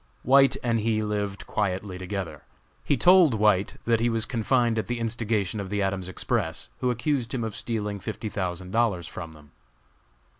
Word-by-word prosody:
White 135 0 +5
and 115 -2 +1
he 110 0 0
lived 105 -2 -3
quietly 95 -2 -2
together. 95 -1 -5 0.4
He 145 - +1
told 175 -1 +6
White 105 -2 +2
that 115 -1 +3
he 120 +1 +2
was 115 -1 0
confined 120 -1 +1
at - - -3
the 120 -1 -2
instigation 110 -3 -1
of 100 -2 -5
the 105 0 0
Adams 95 -1 -2
Express, 95 - -2
who 125 - +1
accused 125 +1 -1
him 120 - -2
of 110 -2 -4
stealing 105 -3 -2
fifty 110 +2 -5
thousand 90 -3 -4
dollars 105 -7 +1
from 85 -3 -8
them. 75 -2 -17
110 Hz, 175 wpm, -26 LUFS, 95-120 Hz, 0.4 s, told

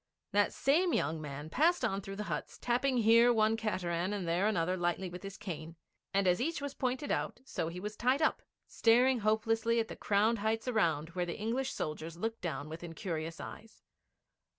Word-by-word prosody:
That 205 0 +3
same 335 +6 +2
young 155 +2 0
man 145 +1 -7
passed 335 - +3
on 195 +1 -1
through 195 0 -7
the 210 - -4
huts, - - -4
tapping 250 +2 +1
here 230 +1 +6
one 220 -1 +3
cateran 185 -4 -1
and 195 -4 -3
there 175 +5 +2
another 180 -3 +1
lightly 175 +1 -1
with 180 0 -7
his 195 -1 -7
cane; 165 -5 -6 0.4
and 195 -1 +2
as 180 +4 +3
each 325 +6 -1
was 285 -1 -4
pointed 260 +1 -2
out, - - -1
so 165 - -3
he 170 +2 -5
was 210 +3 -5
tied 255 +3 +2
up, 315 - +2 0.2
staring 245 +2 +4
hopelessly 225 +2 +2
at 225 - -1
the - - -6
crowned 215 +3 +2
heights 220 +3 -1
around 165 -10 +1
where 175 0 -2
the 170 - -4
English 245 +5 -1
soldiers 155 +2 -4
looked 225 +4 -3
down 165 -4 -3
with 160 +2 -8
incurious 165 -1 -4
eyes. 220 0 -10
205 Hz, 195 wpm, -32 LUFS, 170-230 Hz, 0.4 s, here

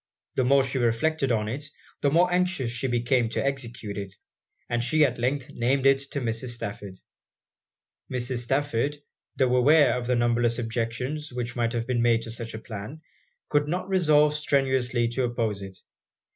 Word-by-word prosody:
The 130 - +1
more 135 +2 +4
she 130 0 -2
reflected 125 +4 +1
on 105 -2 +1
it, 145 +6 -5 0.3
the 140 - +3
more 175 +4 +3
anxious 180 -9 +1
she 120 +3 -2
became 120 -1 +1
to 125 - -2
execute 115 -7 -3
it 100 -1 -7 0.5
and 120 0 -1
she 155 +5 +4
at 125 -3 -2
length 130 +2 -1
named 130 +3 +1
it 135 0 +5
to 140 - -3
Mrs. 120 +1 -2
Stafford. 100 -4 -7 1.1
Mrs. 125 0 -2
Stafford, 140 +2 0 0.4
tho' 130 -2 +2
aware 140 0 +5
of 125 -1 -3
the 125 - +2
numberless 120 0 +2
objections 120 +5 -3
which 120 -1 -4
might 115 0 0
have 115 -1 -1
been 125 -2 0
made 115 -1 +3
to 115 - -6
such 115 -1 -5
a - - -5
plan, 110 +8 -8 0.5
could 145 0 +1
not 180 +4 -2
resolve 150 -5 +4
strenuously 130 -5 +1
to 125 +2 -1
oppose 115 -4 -2
it. 95 -1 -9
125 Hz, 170 wpm, -26 LUFS, 115-140 Hz, 1.1 s, it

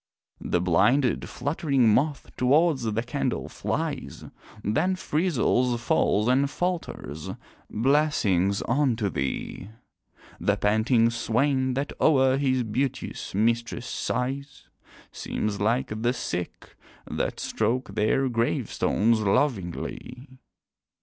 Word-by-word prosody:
The 90 - +1
blinded, 120 +9 +2
fluttering 140 -2 +1
moth 140 +3 0
towards 145 +3 +3
the 115 0 -1
candle 120 - -2
flies, - - -4 0.4
Then 160 - +1
frizzles, 140 -8 +1
falls, 105 -2 +1
and 135 +2 +3
falters 165 - -4 0.4
"Blessings 110 - +2
unto 120 -5 +1
thee" 70 +8 -4 0.7
The - - +1
panting 115 +3 +3
swain 130 +3 0
that 140 +2 -2
o'er 135 -3 +4
his 130 -3 +1
beauteous 125 -2 -3
mistress 115 +2 0
sighs, 135 +3 -4 0.4
Seems 105 -1 -3
like 115 0 0
the 120 +2 +2
Sick, 90 -8 -5 0.3
that - - -3
stroke 115 0 -1
their 110 +6 +1
gravestones 115 -1 +1
lovingly. 125 - -2
125 Hz, 95 wpm, -26 LUFS, 110-135 Hz, 0.7 s, o'er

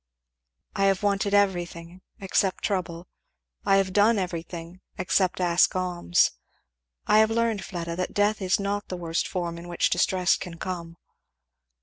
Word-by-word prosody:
"I 195 - +2
have 195 0 +2
wanted 200 0 +1
everything 175 -3 -1 0.2
except 190 -1 0
trouble. 175 -3 -2 0.6
I 195 - +3
have 195 -1 +1
done 210 +3 +4
everything 175 -1 -5 0.2
except 185 0 +1
ask 175 0 +3
alms. 175 - +1 0.7
I 210 - +5
have 220 0 +5
learned, 225 -2 0
Fleda, 170 -3 -5
that 180 - -3
death 205 +1 +2
is 185 +1 +1
not 200 +1 -2
the 180 - -5
worst 165 -1 -2
form 170 -2 -4
in 170 - -10
which 175 -1 0
distress 180 +1 +2
can 170 -2 -8
come." 170 -2 -6
185 Hz, 145 wpm, -26 LUFS, 175-200 Hz, 0.7 s, I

